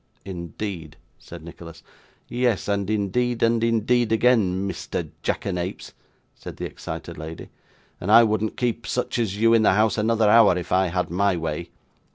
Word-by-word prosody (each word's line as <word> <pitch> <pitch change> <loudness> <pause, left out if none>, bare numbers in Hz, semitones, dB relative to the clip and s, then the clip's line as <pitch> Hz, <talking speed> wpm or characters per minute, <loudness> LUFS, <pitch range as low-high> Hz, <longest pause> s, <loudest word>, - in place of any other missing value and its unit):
'Indeed!' 85 -3 -6 0.2
said 85 -2 -11
Nicholas. 85 0 -11 0.4
'Yes; 120 -4 0
and 100 -1 -1
indeed 110 +4 0
and 115 0 +2
indeed 115 +1 +1
again, 110 -5 +2
Mister 95 -4 -4
Jackanapes,' 90 0 -3 0.4
said - - -10
the - - -4
excited - - -7
lady; 80 +1 -8 0.5
'and 95 - -2
I 115 +2 +9
wouldn't 110 -1 -1
keep 120 -1 -2
such 125 -1 -2
as 105 -4 -1
you 115 +2 +4
in 115 - +5
the 105 - +4
house 110 +2 +2
another 110 0 +2
hour, 105 -4 +6
if 90 -1 -6
I 95 +1 +3
had 90 0 -2
my 95 +1 +1
way. 80 +1 -4
105 Hz, 160 wpm, -23 LUFS, 90-115 Hz, 0.5 s, I